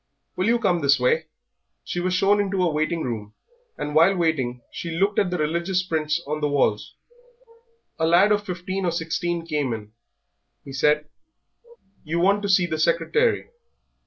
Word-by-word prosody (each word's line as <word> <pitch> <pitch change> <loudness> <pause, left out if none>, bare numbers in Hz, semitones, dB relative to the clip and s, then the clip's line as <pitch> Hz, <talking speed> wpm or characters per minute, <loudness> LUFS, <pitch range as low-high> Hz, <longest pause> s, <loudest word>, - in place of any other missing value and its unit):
"Will 185 +3 0
you 235 +1 +4
come 190 -7 +1
this 140 -1 +4
way?" 155 +6 +1 0.6
She 175 - -4
was 180 +1 0
shown 200 +3 +3
into 195 -2 -1
a 175 - +2
waiting 155 +2 -1
room, 105 -4 -5 0.4
and 150 - -4
while 165 +6 +5
waiting 130 -8 -1
she 170 - -6
looked 195 +5 +1
at 190 - +1
the 180 - -2
religious 170 +4 0
prints 160 -1 -1
on 150 +2 -3
the 150 - +1
walls. 130 -7 0 1.0
A 160 - +2
lad 180 +5 +5
of 205 0 +2
fifteen 185 0 -4
or 175 - +1
sixteen 170 0 -2
came 145 -6 -1
in. 105 -2 -8 0.7
He 135 - -9
said 150 +2 +2 1.0
"You 165 +3 -2
want 200 +3 +3
to 200 - -3
see 185 -2 +4
the 155 -2 -3
secretary?" 170 - +1
170 Hz, 170 wpm, -23 LUFS, 150-185 Hz, 1.0 s, while